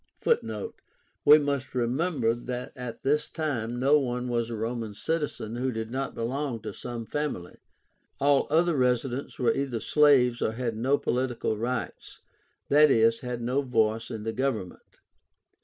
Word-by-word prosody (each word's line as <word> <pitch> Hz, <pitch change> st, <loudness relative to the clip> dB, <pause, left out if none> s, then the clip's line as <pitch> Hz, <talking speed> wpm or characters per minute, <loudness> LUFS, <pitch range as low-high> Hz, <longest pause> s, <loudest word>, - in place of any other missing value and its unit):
(Footnote: 465 Hz, -1 st, -1 dB, 0.5 s
We 150 Hz, +1 st, +9 dB
must 140 Hz, -3 st, -2 dB
remember 125 Hz, 0 st, +1 dB
that 125 Hz, +1 st, -6 dB
at 125 Hz, -2 st, -7 dB
this 150 Hz, +2 st, +1 dB
time 120 Hz, -7 st, -3 dB
no 140 Hz, +4 st, +5 dB
one 125 Hz, -2 st, -2 dB
was 120 Hz, -1 st, -1 dB
a 115 Hz, -, -4 dB
Roman 115 Hz, -1 st, -4 dB
citizen 120 Hz, -3 st, -3 dB
who 130 Hz, +1 st, -1 dB
did 110 Hz, -1 st, -5 dB
not 135 Hz, +2 st, -3 dB
belong 125 Hz, +1 st, -2 dB
to -, -, -5 dB
some 120 Hz, -2 st, -6 dB
family. 145 Hz, -11 st, -4 dB, 0.6 s
All 140 Hz, -1 st, +3 dB
other 165 Hz, +2 st, +3 dB
residents 125 Hz, +1 st, 0 dB
were 125 Hz, -3 st, +2 dB
either 135 Hz, -4 st, -2 dB
slaves 130 Hz, -4 st, +4 dB
or 110 Hz, -, 0 dB
had 115 Hz, -1 st, -3 dB
no 130 Hz, +6 st, +2 dB
political 125 Hz, -4 st, -1 dB
rights, 120 Hz, +2 st, -4 dB, 0.5 s
i.e. 140 Hz, -6 st, +6 dB
had 125 Hz, -1 st, -4 dB
no 130 Hz, +4 st, +1 dB
voice 115 Hz, -3 st, 0 dB
in 110 Hz, -3 st, -5 dB
the 115 Hz, 0 st, -3 dB
government.) 115 Hz, -9 st, -4 dB
125 Hz, 150 wpm, -27 LUFS, 115-140 Hz, 0.6 s, We